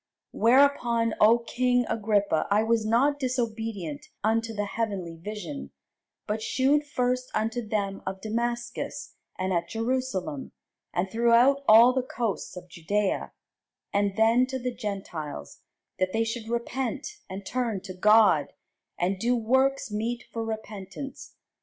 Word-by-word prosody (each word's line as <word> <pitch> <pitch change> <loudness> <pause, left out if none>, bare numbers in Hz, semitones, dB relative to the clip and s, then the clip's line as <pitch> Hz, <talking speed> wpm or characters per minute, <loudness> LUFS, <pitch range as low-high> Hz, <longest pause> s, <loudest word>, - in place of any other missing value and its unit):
Whereupon, 235 -2 +3
O 225 +3 +7
king 245 +1 +1
Agrippa, 205 -6 +1
I 205 +2 +3
was 225 -1 +1
not 275 +6 +3
disobedient 225 - -3 0.2
unto 225 +1 +1
the 205 -2 -2
heavenly 200 -6 -3
vision: 210 - -6 0.6
but 215 +1 -2
shewed 285 +6 +2
first 250 -2 -1
unto 225 +3 0
them 205 -3 -2
of 190 0 -3
Damascus, 235 +3 -3 0.2
and 185 0 -1
at 170 -1 -1
Jerusalem, 225 - -2 0.4
and 175 +2 0
throughout 235 +4 +4
all 230 +4 +8
the 260 - +1
coasts 235 -7 -3
of 180 - -9
Judæa, 190 +4 -1 0.6
and 200 -1 +1
then 230 +3 +4
to 265 0 -3
the 250 -1 -3
Gentiles, 175 - -6 0.4
that 185 0 0
they 225 0 +2
should 225 0 -4
repent 260 - -3
and 190 +1 -7
turn 235 -4 -1
to 190 -1 -8
God, 210 +4 +4 0.4
and 185 +2 0
do 240 +4 +2
works 265 +2 +1
meet 230 +3 -2
for 230 - -2
repentance. 220 +3 -7
225 Hz, 135 wpm, -27 LUFS, 200-245 Hz, 0.6 s, all